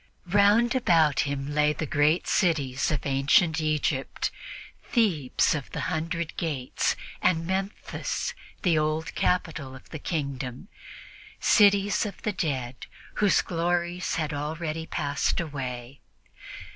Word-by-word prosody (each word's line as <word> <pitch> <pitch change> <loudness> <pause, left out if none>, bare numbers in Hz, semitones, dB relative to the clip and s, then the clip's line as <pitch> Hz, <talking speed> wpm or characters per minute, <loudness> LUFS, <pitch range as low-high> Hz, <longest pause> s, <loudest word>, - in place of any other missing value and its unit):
Round 210 +4 +5
about 165 - +3
him 140 +1 -3
lay 150 0 +3
the 155 - -3
great 150 +3 +2
cities 140 -7 +1
of 150 -5 -2
ancient 150 +4 +3
Egypt 150 -3 -1 0.5
"Thebes 175 - +2
of 145 -4 -4
the - - -3
Hundred 165 +1 -3
Gates" 145 -7 -1 0.3
and 165 -2 +2
Memphis, 190 +3 -3 0.3
the 170 -4 +3
old 155 +1 -1
capital 155 -7 -1
of 130 - -14
the 160 - -6
kingdom 140 - -4 0.7
cities 200 -1 +4
of 200 - -9
the 215 - -1
dead 130 -8 -3 0.3
whose 205 -2 +4
glories 175 +1 -1
had 155 -2 -2
already 155 +2 -3
passed 145 -3 -1
away. 130 -5 -5
155 Hz, 120 wpm, -27 LUFS, 140-175 Hz, 0.7 s, Round